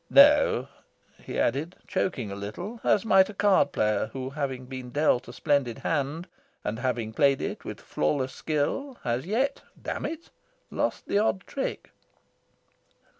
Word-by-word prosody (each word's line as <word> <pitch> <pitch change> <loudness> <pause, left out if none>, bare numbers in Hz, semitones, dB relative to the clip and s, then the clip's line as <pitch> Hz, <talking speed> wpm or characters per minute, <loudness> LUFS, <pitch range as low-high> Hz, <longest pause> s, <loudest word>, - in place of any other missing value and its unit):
"No," 280 - +6 0.6
he - - -4
answered, 145 +9 0
choking 125 - -1
a - - -4
little, 105 - -6
as 205 - +3
might 190 -2 +5
a 210 - -8
card 200 0 +4
player 110 0 +1
who, 130 0 -4
having 135 -3 -3
been 130 -1 -7
dealt 145 -2 +2
a - - -7
splendid 135 -6 +1
hand, 160 +3 -2 0.4
and 110 +2 -3
having 120 -4 -1
played 140 +1 +4
it - - -4
with - - -6
flawless 130 -3 -1
skill, 200 - -2
has 120 +6 -1
yet 265 +7 0 0.2
damn - - -3
it! 330 +1 -8 0.4
lost - - -1
the 200 - +2
odd 205 -3 +1
trick. 275 - -4
145 Hz, 150 wpm, -27 LUFS, 125-200 Hz, 0.6 s, No